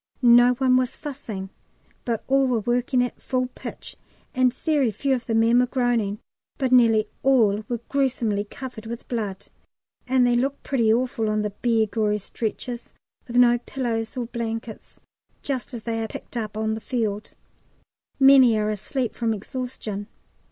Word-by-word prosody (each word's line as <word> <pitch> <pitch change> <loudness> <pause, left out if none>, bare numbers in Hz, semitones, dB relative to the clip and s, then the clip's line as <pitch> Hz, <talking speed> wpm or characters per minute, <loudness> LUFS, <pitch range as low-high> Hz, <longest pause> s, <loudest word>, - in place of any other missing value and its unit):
No 245 +1 +7
one 255 0 +3
was 255 0 0
fussing, 225 -10 -7 0.5
but 230 -3 -2
all 270 0 +3
were 240 -3 +1
working 245 +3 +1
at 245 - -5
full 255 -1 -1
pitch; - - -8 0.4
and 255 -1 +3
very 285 -1 +1
few 270 +6 -1
of 245 -3 -3
the 225 - 0
men 230 +2 +4
were 250 - +3
groaning, 240 -5 0 0.4
but 265 -4 -1
nearly 225 -4 +5
all 220 -6 +3
were 240 -2 -2
gruesomely 245 -7 0
covered 235 -1 -8
with 235 0 -7
blood. 210 -6 -4 0.6
And 255 -1 +3
they 245 - +3
look 270 +4 0
pretty 235 -5 +2
awful 235 -1 0
on 215 0 0
the 210 - -2
bare 225 +1 +1
gory 210 -1 0
stretchers, 230 +3 -5 0.3
with 240 - -7
no 240 -1 +5
pillows 235 -2 -3
or 245 - -1
blankets, 225 -1 -6 0.4
just 270 -2 -3
as 235 -3 -6
they 225 -1 -2
are 220 - -2
picked 220 - -10
up 215 -2 -4
on 220 0 0
the 220 - -5
field. 215 -5 -3 0.8
Many 265 -4 +7
are 215 0 0
asleep 240 +4 -3
from 225 -2 -1
exhaustion. 215 -2 -6
240 Hz, 165 wpm, -24 LUFS, 220-255 Hz, 0.8 s, No